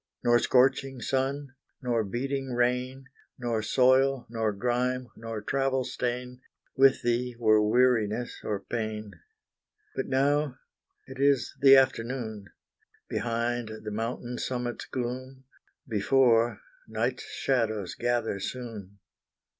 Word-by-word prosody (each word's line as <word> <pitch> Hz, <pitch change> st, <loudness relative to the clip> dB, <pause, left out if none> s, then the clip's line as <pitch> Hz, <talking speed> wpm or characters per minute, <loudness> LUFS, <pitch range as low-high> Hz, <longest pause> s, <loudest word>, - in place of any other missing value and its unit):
Nor 120 Hz, 0 st, +5 dB
scorching 135 Hz, +1 st, +2 dB
sun, 135 Hz, +2 st, -1 dB, 0.3 s
nor 120 Hz, -3 st, 0 dB
beating 135 Hz, +5 st, -3 dB
rain, 125 Hz, +2 st, 0 dB, 0.3 s
Nor 120 Hz, -3 st, -1 dB
soil, 130 Hz, +3 st, +3 dB
nor 110 Hz, -2 st, 0 dB
grime, 125 Hz, +3 st, -1 dB
nor 115 Hz, -2 st, -6 dB
travel 135 Hz, +1 st, 0 dB
stain, 125 Hz, +1 st, -4 dB, 0.3 s
With 135 Hz, 0 st, +5 dB
thee, 120 Hz, +1 st, 0 dB
were 110 Hz, -2 st, +4 dB
weariness 120 Hz, 0 st, +2 dB
or 100 Hz, -2 st, -2 dB
pain. 110 Hz, -1 st, -4 dB, 0.8 s
But -, -, -2 dB
now 140 Hz, 0 st, +1 dB, 0.5 s
it 130 Hz, 0 st, -10 dB
is 140 Hz, -3 st, +2 dB
the 135 Hz, -1 st, +9 dB
afternoon 115 Hz, -5 st, 0 dB, 0.6 s
Behind, 120 Hz, 0 st, -1 dB
the 105 Hz, -, -5 dB
mountain 120 Hz, +3 st, -4 dB
summit's 125 Hz, -1 st, -3 dB
gloom: 130 Hz, +1 st, -5 dB, 0.4 s
Before, 115 Hz, +1 st, +3 dB, 0.3 s
night's 445 Hz, -, -2 dB
shadows 110 Hz, -, -1 dB
gather 120 Hz, -4 st, -1 dB
soon. 105 Hz, -4 st, -6 dB
125 Hz, 105 wpm, -28 LUFS, 115-130 Hz, 0.8 s, the